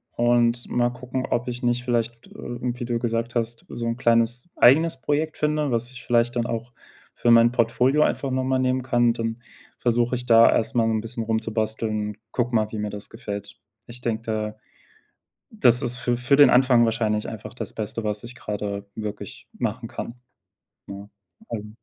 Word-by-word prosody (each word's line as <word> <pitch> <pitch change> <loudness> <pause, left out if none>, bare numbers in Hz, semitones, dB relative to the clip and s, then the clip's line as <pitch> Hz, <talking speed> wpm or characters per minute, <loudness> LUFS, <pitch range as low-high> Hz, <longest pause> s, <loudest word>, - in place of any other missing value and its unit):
und 120 0 +2
mal 120 0 +2
gucken, 125 +1 -4
ob 120 -2 -1
ich 125 +1 -5
nicht 120 0 +1
vielleicht, 120 -1 -2
äh, - - -21 0.3
wie 125 0 -3
du 120 -1 -1
gesagt 115 0 -2
hast, 115 0 -2
„so 115 - -5
'n 115 +1 -1
kleines 120 +3 +2
eigenes 135 +2 +5
Projekt 155 +3 -1
finde“, 150 -2 0
was 115 +1 -1
ich 130 - -10
vielleicht 120 0 +2
dann 120 - 0
auch 115 +1 -4 0.4
für 120 - +2
mein 115 0 +6
Portfolio 125 +5 +3
einfach 135 -3 -1
noch 130 0 0
mal 130 0 +1
nehmen 130 0 +1
kann. 120 -2 +3
Dann 115 +1 -4 0.4
versuche 120 +1 +1
ich 125 0 -5
da 115 -1 +7
erstmal 115 0 +1
'n 110 -1 0
bisschen 115 +1 -5
rumzubasteln 110 -1 -1
und 105 - -8
gucke 120 -1 -1
mal, 110 -1 +1
wie 110 - -5
mir 105 0 -2
das 105 0 -7
gefällt. 100 -3 -7 0.3
Ich 120 +1 -9
denke, 115 -2 -2
da 110 -1 -3 1.0
das 125 - +4
ist 125 +1 0
für 120 0 0
für 125 +3 +2
den 145 -3 +8
Anfang 125 -2 +5
wahrscheinlich 110 -2 0
einfach 110 -2 -7
das - - -6
Beste, 110 +1 -4
was 105 -1 -2
ich 120 +1 -10
gerade 100 -2 -4
wirklich 105 -2 -7
machen 115 0 -3
kann. 115 - -6 0.7
Ne, 100 +1 -9 0.4
also 105 -2 -5
120 Hz, 185 wpm, -24 LUFS, 110-125 Hz, 1.0 s, den